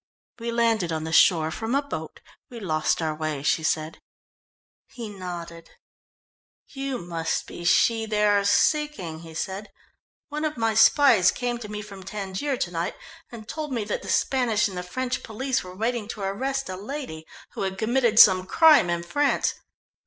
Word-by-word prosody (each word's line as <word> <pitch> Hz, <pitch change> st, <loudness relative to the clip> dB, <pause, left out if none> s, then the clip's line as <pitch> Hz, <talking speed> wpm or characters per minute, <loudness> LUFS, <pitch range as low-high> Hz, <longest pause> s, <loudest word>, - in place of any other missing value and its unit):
"We 235 Hz, 0 st, -3 dB
landed 230 Hz, -6 st, +1 dB
on 160 Hz, -1 st, -2 dB
the 160 Hz, -, -5 dB
shore 160 Hz, -2 st, +5 dB
from 225 Hz, +8 st, -2 dB
a 280 Hz, -, +3 dB
boat. 285 Hz, -, -7 dB, 0.3 s
We 240 Hz, -3 st, -9 dB
lost 160 Hz, -4 st, 0 dB
our 155 Hz, -1 st, -1 dB
way," 155 Hz, -2 st, -4 dB
she 155 Hz, -, +2 dB
said. 155 Hz, 0 st, -1 dB, 0.9 s
He 240 Hz, -5 st, -8 dB
nodded. 170 Hz, -4 st, -8 dB, 1.0 s
"You 270 Hz, -1 st, -4 dB
must 165 Hz, -3 st, -3 dB
be 175 Hz, -, -9 dB
she 225 Hz, +5 st, +3 dB
they 210 Hz, -1 st, +1 dB
are 205 Hz, -1 st, +3 dB
seeking," 205 Hz, -, +1 dB
he 165 Hz, -1 st, -12 dB
said. 195 Hz, +5 st, -4 dB, 0.6 s
"One 300 Hz, +1 st, -4 dB
of 305 Hz, -3 st, -2 dB
my 225 Hz, -1 st, +1 dB
spies 225 Hz, -4 st, +6 dB
came 245 Hz, -1 st, -2 dB
to 215 Hz, -3 st, -8 dB
me 210 Hz, 0 st, -5 dB
from 200 Hz, -2 st, -11 dB
Tangier 195 Hz, +7 st, -3 dB
to 175 Hz, -, -2 dB
night, 170 Hz, +2 st, -3 dB, 0.4 s
and 220 Hz, -2 st, -10 dB
told 305 Hz, +1 st, -5 dB
me 235 Hz, -4 st, -1 dB
that 205 Hz, -, -3 dB
the -, -, -8 dB
Spanish 235 Hz, -5 st, +2 dB
and 195 Hz, -, -8 dB
the 180 Hz, -, -3 dB
French 255 Hz, +8 st, -3 dB
police 260 Hz, +4 st, -2 dB
were 180 Hz, 0 st, -10 dB
waiting 225 Hz, +1 st, -2 dB
to 215 Hz, -, -7 dB
arrest 265 Hz, +8 st, -2 dB
a 185 Hz, -, -5 dB
lady 200 Hz, -, -7 dB, 0.2 s
who -, -, -7 dB
had 190 Hz, -1 st, -2 dB
committed 235 Hz, +1 st, +1 dB
some 185 Hz, -4 st, +7 dB
crime 305 Hz, -, +6 dB
in 170 Hz, 0 st, -1 dB
France. 290 Hz, +11 st, +1 dB
210 Hz, 175 wpm, -25 LUFS, 175-245 Hz, 1.0 s, some